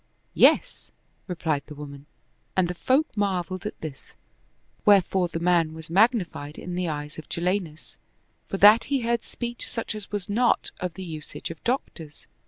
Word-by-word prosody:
"Yes," - - +3 0.4
replied 160 -5 -1
the 150 - -9
woman, 140 -1 -9 0.5
and 185 -2 +4
the 180 - -3
folk 260 - +1
marveled 190 -1 -1
at - - -8
this; 150 -4 -9 0.7
wherefore 190 -2 +4
the 165 - -4
man 170 -2 +2
was 160 0 -10
magnified 185 - +2
in 180 - -6
the 180 0 -1
eyes 150 0 -5
of 155 - -11
Jalinus, 175 -2 -2 0.5
for 195 - -3
that 210 +4 +7
he 275 -2 0
heard 235 0 0
speech 240 0 -5
such 230 -1 -4
as 210 -2 -7
was 205 -3 -3
not 235 +4 +2
of 180 -3 -4
the 190 - -6
usage 155 -1 -6
of 165 - -11
doctors. 170 - -3
180 Hz, 165 wpm, -26 LUFS, 160-210 Hz, 0.7 s, that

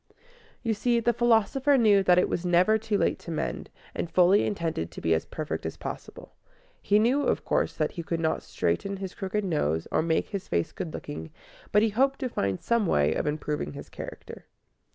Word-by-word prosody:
You 230 -2 +1
see, 235 +3 +1
the 235 +1 +2
philosopher 240 +4 +3
knew 210 -5 +5
that 180 -2 +4
it 180 - +4
was 175 - -2
never 180 +5 +3
too 220 -1 -1
late - - +1
to - - -11
mend, 160 - -3 0.2
and 170 - -3
fully 185 +4 +4
intended 165 - -2
to 80 - -9
be 80 - +1
as 80 - -1
perfect 155 -1 -4
as - - -5
possible. - - -8 0.5
He 205 - +3
knew, 245 +7 +3
of - - 0
course, - - 0
that - - 0
he 170 - -5
could 165 0 -3
not 160 -1 0
straighten 195 - -2
his 190 -1 -6
crooked 200 +1 -2
nose 80 - 0
or - - +2
make 160 0 0
his 200 -3 -5
face 85 - -1
good 180 -4 -5
looking, 80 - -7 0.4
but 210 +1 +4
he 225 - +3
hoped 270 +6 +2
to 260 - -1
find 100 - -2
some 235 -4 +2
way 75 - +3
of - - -2
improving 150 0 -2
his 140 - -9
character. - - -9
190 Hz, 205 wpm, -27 LUFS, 155-220 Hz, 0.5 s, knew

